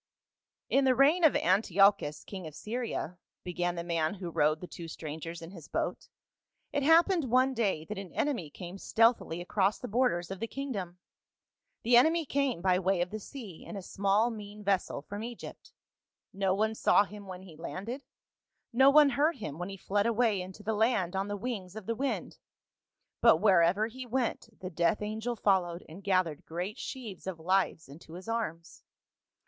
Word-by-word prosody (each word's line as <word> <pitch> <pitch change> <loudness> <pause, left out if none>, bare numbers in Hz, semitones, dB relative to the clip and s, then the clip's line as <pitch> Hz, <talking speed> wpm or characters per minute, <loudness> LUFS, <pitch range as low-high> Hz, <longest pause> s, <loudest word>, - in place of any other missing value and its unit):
" - - -37
TN 275 0 +4
the 260 -1 +4
reign 300 +7 +4
of 315 - +6
Antiochus, 190 -4 +3
king 190 -4 -7
of 155 - -10
Syria," 220 -6 -4 0.2
began 175 0 -2
I 170 - -3
the - - -12
man 165 +1 0
who 180 -3 -6
rowed 155 0 +2
the 180 - -7
two 170 -1 -9
strangers 160 +1 -7
in 165 - -9
his 170 -6 -11
boat, - - -3 0.3
" - - -51
it 285 - +1
happened 325 0 +4
one 255 +2 +3
day 200 -10 0
that 210 +1 -5
an 195 -3 -8
enemy 245 - -1
came 180 +5 -9
stealthily 225 -8 +2
across 195 +3 +1
the 250 - -7
borders 210 -7 +1
of 195 - -5
the 230 - -2
kingdom. 210 -11 -5 0.9
The 240 +1 +6
enemy 320 +5 +4
came 270 -10 -1
by 185 -1 +3
way 190 -1 +1
of 180 - -1
the 215 - -4
sea 215 - -9
in - - -8
a 195 - -7
small 200 +5 +1
mean 210 -1 -9
ves 195 -2 +2
sel 140 - -6
from 205 +6 -6
Egypt. 235 0 -9 0.6
No 190 -1 +1
one 220 +2 +1
saw 210 - +4
him 205 -1 -10
when 185 0 -8
he 175 -4 -13
landed, 200 - -6 0.7
no 265 +3 +7
one 295 0 +7
heard 300 +6 +2
him 160 - -6
when 175 +2 -4
he 195 - -7
fled 205 +3 0
away 225 -4 +2
into 190 +3 -9
the 220 - -1
land 210 -5 +1
on 195 +1 -1
the 205 0 -3
wings 200 -5 -5
of 220 -3 -7
the 230 - -1
wind, 270 +4 -3 0.8
but 230 -8 +7
wherever 185 +1 +4
he 250 +3 -8
went 240 -1 -1
the 185 0 -5
death 170 +5 +1
angel 220 +3 -3
followed 185 -5 +1
and 170 +5 -11
gathered 185 -6 +1
great 180 +7 -4
sheaves 230 -9 -7
of 190 -3 -3
lives 180 -2 +1
into 155 +3 -13
his 185 +4 -9
arms. 185 -8 -4
200 Hz, 190 wpm, -30 LUFS, 175-235 Hz, 0.9 s, no